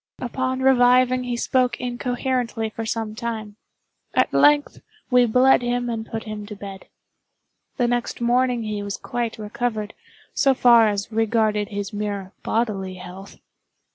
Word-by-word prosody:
Upon 260 +1 -2
reviving 255 -1 +4
he 245 -1 -2
spoke 255 0 +1
incoherently 245 -2 -2
for 225 0 -5
some 220 -1 -3
time. 220 -2 -5 0.6
At - - +2
length 290 0 +3 0.3
we 250 -1 +5
bled 255 +4 +5
him 245 0 -1
and 225 -1 -4
put 225 0 -4
him 215 -1 -7
to 210 - -7
bed. 195 -1 -9 0.9
The 245 -3 +2
next 240 0 -2
morning 245 0 +1
he 210 -1 -3
was 200 -1 -4
quite 240 -2 -4
recovered, 215 0 -3 0.4
so 270 -1 +3
far 235 -3 +6
as 205 +1 -2
regarded 220 -2 +1
his 200 0 -5
mere 205 -2 -4
bodily 200 -5 -2
health. 185 +2 -11
230 Hz, 140 wpm, -23 LUFS, 210-245 Hz, 0.9 s, far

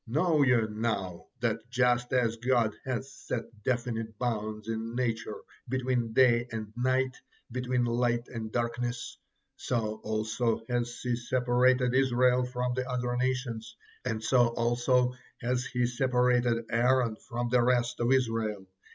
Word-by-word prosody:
Know 155 +5 +2
ye 130 -3 +5
now 105 -5 -3
that 115 0 -1
just 125 -1 +2
as 120 -3 +2
God 120 -2 +2
has 130 +1 -3
set 120 - -4 0.2
definite 115 -2 -2
bounds 110 -3 -3
in 115 +1 -3
nature 115 -3 -2 0.3
between 125 -2 0
day 120 -1 +4
and 110 -1 -5
night, 130 +1 +1 0.3
between 125 0 0
light 120 0 0
and 110 -3 -6
darkness, 120 0 -2 0.4
so 110 -3 -1
also 110 +2 -1
has 120 -1 -2
He 125 -1 +1
separated 125 +1 +2
Israel 125 -1 +3
from 125 0 -2
the 130 +1 -3
other 125 -1 -1
nations, 125 -3 -2 0.3
and 110 -3 -2
so 120 +1 +4
also 120 +2 +2 0.3
has 125 +1 -1
he 125 -1 0
separated 125 -1 +2
Aaron 120 -1 +3
from 120 -1 -4
the 125 0 +4
rest 120 -1 +1
of 120 +1 +2
Israel. 115 -6 0
120 Hz, 135 wpm, -29 LUFS, 115-125 Hz, 0.4 s, ye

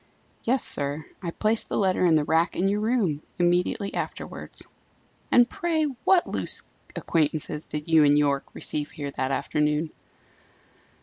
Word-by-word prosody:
"Yes, 255 +3 +3
sir. 145 +1 0 0.2
I 175 - -3
placed 215 +6 0
the - - -1
letter 190 -2 +1
in 165 - +4
the 155 - +3
rack 160 +3 +1
in 190 - +1
your 205 +1 +1
room, 210 -10 0 0.2
immediately 180 +3 +1
afterwards." - - -5 0.7
"And, 245 -1 +6
pray, 330 0 -1 0.2
what 370 -2 +5
loose - - +1 0.3
acquaintances 155 -1 -1
did 150 +1 -5
you 160 -2 +5
and 145 0 +5
Yorke 140 -2 0
receive 150 -1 -2
here 145 -2 -6
that 130 -1 -2
afternoon?" 150 +3 0
160 Hz, 145 wpm, -25 LUFS, 150-200 Hz, 0.7 s, And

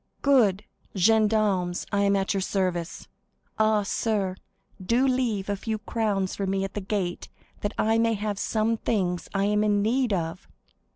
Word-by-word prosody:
"Good! 220 -8 +4 0.3
Gendarmes, 205 -3 +2
I 200 - +1
am 200 0 +3
at 195 +1 0
your 195 - -1
service. 185 -3 -2 0.5
Ah, 215 -1 +3
sir, 200 -2 -1 0.5
do 240 +7 +2
leave 240 -7 0
a 205 - 0
few 220 +2 -3
crowns 205 -3 -1
for 195 - -3
me 195 0 0
at 195 - -4
the 205 - -3
gate 190 -3 -3 0.3
that 205 +1 -3
I 225 +1 +2
may 230 0 +2
have 205 -1 -3
some 225 +1 0
things 180 -6 -1
I 195 0 +2
am 210 +1 +2
in 205 -1 +2
need 245 +2 +1
of!" 170 -1 -3
205 Hz, 165 wpm, -26 LUFS, 195-220 Hz, 0.5 s, Good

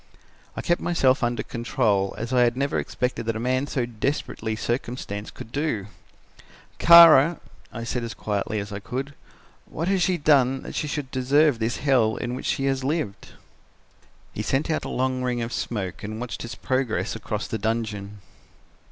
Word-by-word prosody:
"I - - -3
kept 175 -1 +1
myself 135 -6 +2
under 120 -2 0
control 110 -5 0
as 115 +3 -4
I 125 - +4
had 120 0 +2
never 140 +1 0
expected 125 -2 -3
that 115 - 0
a - - -3
man 130 +3 0
so 130 -4 -1
desperately 115 -1 -3
circumstanced 115 -3 -4
could 110 - -10
do. 140 -8 -1 0.9
"'Kara,' 170 -2 +8 0.3
I 115 - -6
said 120 +1 -3
as 115 -1 -5
quietly 105 +1 -2
as 100 +1 -6
I 100 - -4
could, 135 +7 -5 0.5
'what 165 +3 -4
has 195 -1 +2
she 180 0 +2
done 135 -4 +3
that - - -8
she 150 - -2
should 145 -2 -4
deserve 140 +1 +3
this 115 +2 -1
hell 125 -6 +2
in 120 +1 -4
which 130 - -5
she 135 - 0
has 135 -1 0
lived?' 140 -8 -3 1.0
"He - - -3
sent 140 +4 0
out 155 - -1
a - - -4
long 130 0 -1
ring 125 -2 -1
of 115 - -5
smoke 95 -6 -3
and 110 +1 -5
watched 125 0 -5
its 115 - -6
progress 120 -7 -1
across 105 -1 -4
the 110 - -3
dungeon. 105 -2 -3
125 Hz, 180 wpm, -24 LUFS, 110-140 Hz, 1.0 s, Kara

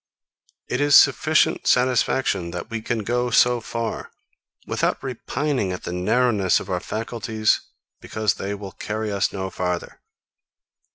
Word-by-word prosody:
It 125 - -1
is 145 0 +5
sufficient 155 +3 +4
satisfaction, 125 -7 +2
that 90 +6 -7
we 115 -1 -3
can 110 -1 -2
go 120 +3 0
so 120 0 +4
far, 115 0 -4 0.6
without - - 0
repining 130 -3 -2
at 90 - -6
the 90 - -4
narrowness 100 +1 +2
of - - -7
our 90 - 0
faculties 110 +1 -1 0.4
because 110 -2 -1
they 100 +2 -4
will 100 -1 -8
carry 110 +1 -4
us 100 -1 0
no 95 -1 -4
farther. 90 -1 -4
110 Hz, 135 wpm, -23 LUFS, 95-125 Hz, 0.6 s, is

